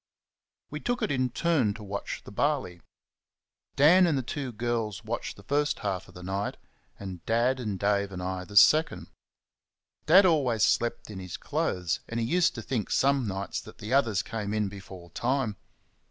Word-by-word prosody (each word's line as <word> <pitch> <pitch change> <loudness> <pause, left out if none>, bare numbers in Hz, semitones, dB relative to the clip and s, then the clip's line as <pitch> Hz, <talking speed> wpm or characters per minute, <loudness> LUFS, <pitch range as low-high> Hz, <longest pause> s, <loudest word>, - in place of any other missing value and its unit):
We 150 - -4
took 245 +8 -2
it - - 0
in 130 -2 +1
turns 130 -7 +1
to 110 - -9
watch 100 0 -5
the - - -11
barley. 130 - -1 0.9
Dan 175 +6 +6
and 155 -4 +1
the 130 - -1
two 130 +1 -4
girls 115 -2 -2
watched 115 +2 -4
the 100 - -14
first 145 +4 0
half 95 -3 -2
of - - -17
the 90 - -10
night, 95 +2 -3 0.4
and 95 -4 -7
Dad, 120 +3 +2 0.2
Dave 100 0 +1
and 90 - -6
I 95 0 -3
the 105 +1 -4
second. 155 +9 +5 1.0
Dad 185 +5 +8
always 135 - +2
slept 120 -2 +1
in 95 - -7
his 90 -2 -6
clothes, 90 -3 -1
and 115 - -2
he 115 - 0
used 175 +7 +2
to 115 - -6
think 115 -5 -2
some 135 -3 +2
nights 95 0 -3
that 110 -2 -13
the 110 +3 -5
others 115 -7 +2
came 105 -2 -4
in 105 -2 0
before 95 -3 -11
time. 125 -1 -1
115 Hz, 180 wpm, -28 LUFS, 100-140 Hz, 1.0 s, Dad